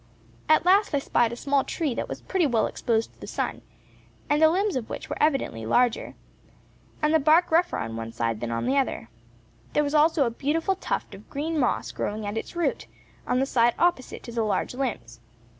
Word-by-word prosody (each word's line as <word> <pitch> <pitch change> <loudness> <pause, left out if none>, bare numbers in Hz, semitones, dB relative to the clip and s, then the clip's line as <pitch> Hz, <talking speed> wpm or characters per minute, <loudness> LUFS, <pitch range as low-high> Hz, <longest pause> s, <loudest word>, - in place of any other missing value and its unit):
At 310 +2 +5
last 390 -2 +4
I - - +3
spied 240 -4 +1
a - - -4
small 275 +2 +1
tree, 305 -6 -2
that - - -4
was - - -6
pretty 370 -5 +1
well 235 -4 +2
exposed 225 -2 -1
to - - -29
the - - -8
sun, - - -3 0.7
and 295 +1 +3
the 315 - +7
limbs 390 +4 +1
of 250 -4 -3
which - - -6
were - - -4
evidently 270 - +1
larger, 240 - +1 0.9
and 300 +1 +3
the 320 - +5
bark 320 +4 +4
rougher 345 +2 +3
on 115 0 -4
one 115 0 -5
side 115 -1 -2
than 120 - -4
on 115 0 -2
the 270 +2 +1
other; 255 - -2 0.6
there 295 - +3
was 290 0 -2
also 305 -1 +4
a 235 - -1
beautiful 320 +10 0
tuft - - -3
of - - -13
green 310 +3 -2
moss 250 - 0
growing 210 +1 -3
at 205 +1 -4
its 225 - -5
root, 345 -1 -1 0.4
on 250 - +1
the 265 - +2
side 240 -3 +2
opposite 340 -7 0
to 235 - -8
the 230 0 -1
large 215 +2 -1
limbs. 165 - -4
270 Hz, 210 wpm, -26 LUFS, 225-315 Hz, 0.9 s, the